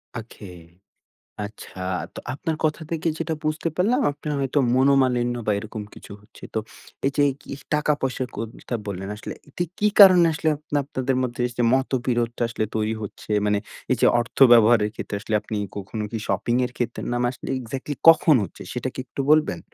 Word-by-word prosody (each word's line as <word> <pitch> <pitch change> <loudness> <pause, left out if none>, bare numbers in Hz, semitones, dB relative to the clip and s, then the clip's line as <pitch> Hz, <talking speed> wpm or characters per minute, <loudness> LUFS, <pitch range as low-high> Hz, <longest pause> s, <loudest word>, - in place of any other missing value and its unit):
ওকে। 110 -3 -8 1.0
আচ্ছা 100 -2 -10 0.3
তো - - -6
আপনার 160 +3 -3
কথা 155 +1 0
থেকে 165 0 -1
যেইটা 160 0 -2
বুঝতে 155 +2 -1
পারলাম 230 +9 +2
আপনার 150 +1 -5
হয়তো 135 +1 0 0.2
মনোমালিন্য 130 -2 +3
বা - - +2
এইরকম 110 +1 -6
কিছু - - -12
হচ্ছে। 105 - -20
তো - - +1 0.5
এই 140 - +3
যে - - +2
এই 135 - -1
কি - - -12 0.2
টাকা 150 0 +2
পয়সার 130 -1 -2
কোনথা 115 +2 -6
বললেন 95 -1 -5
আসলে 105 - -7
এটা 175 +5 -3
কি 210 - +2
কারণে 185 -3 +9
আসলে 155 +1 -1
আপনে 150 0 -5
আপনাদের 130 -1 -2
মধ্যে 125 -1 -4
এইযে 120 0 -3
মতবিরোধটা 120 -3 0
আসলে 110 -1 -2
তৈরি 110 0 0
হচ্ছে? 105 - -9 0.2
মানে 105 0 +2 0.3
এই - - +2
যে - - +5
অর্থ 120 - -7 0.2
ব্যবহারের 110 -2 +6
ক্ষেত্রে 105 - -5
আসলে 110 - -3
আপনি 105 +1 -5 0.2
কখনো 100 +2 -5
কি 115 - -3
শপিং 120 - 0
এর 125 - -12
ক্ষেত্রে 120 -1 -3
না - - 0
মা - - +2
আসলে 130 - -8
এক্স্যাক্টলি 130 +4 -5
কখন 160 -1 +7
হচ্ছে 90 - -10
সেইটা 125 +1 -3
কি - - -13
একটু 135 - -6
বলবেন? 155 - +3
125 Hz, 185 wpm, -23 LUFS, 110-150 Hz, 1.0 s, কারণে